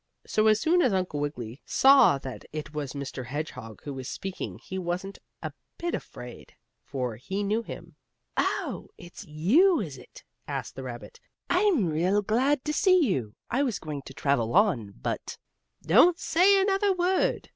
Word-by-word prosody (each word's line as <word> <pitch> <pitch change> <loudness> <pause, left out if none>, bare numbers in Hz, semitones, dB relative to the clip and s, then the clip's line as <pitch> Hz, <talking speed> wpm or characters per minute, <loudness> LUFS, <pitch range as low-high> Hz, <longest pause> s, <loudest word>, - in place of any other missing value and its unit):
So 215 0 +2
as 215 0 +5
soon 345 +8 +3
as 250 - +3
Uncle 185 -6 -1
Wiggily 130 -4 -5
saw 270 - +6
that 130 -1 -8
it 155 0 -6
was 150 -3 -4
Mr. 140 -2 -5
Hedgehog 130 -6 -6
who 145 - -5
was 130 -1 -6
speaking 190 -1 -5
he 190 - -6
wasn't 185 +2 -4 0.2
a - - -4 0.2
bit 345 0 -3
afraid, 125 0 -8 0.3
for 125 -5 -4
he 190 - -3
knew 210 +3 0
him. - - -10 0.4
"Oh, - - -1
it's 175 +2 -11
you, 245 - +4
is 145 -10 -5
it?" - - -15 0.2
asked - - -4
the 135 - -6
rabbit. 120 -2 -8 0.3
"I'm 360 - +3
real 180 +6 +1
glad 255 +7 +1
to 300 - -1
see 370 +2 +4
you. 110 - -2 0.2
I 255 - +2
was 250 -8 0
going 150 -3 -6
to 135 - -9
travel 140 -4 0
on, 150 - +2
but - - -4 0.2
" - - -41
"Don't 335 +8 +7
say 375 +4 +4
another 390 +1 +2
word!" 365 +1 +1
185 Hz, 170 wpm, -27 LUFS, -, 0.4 s, Don't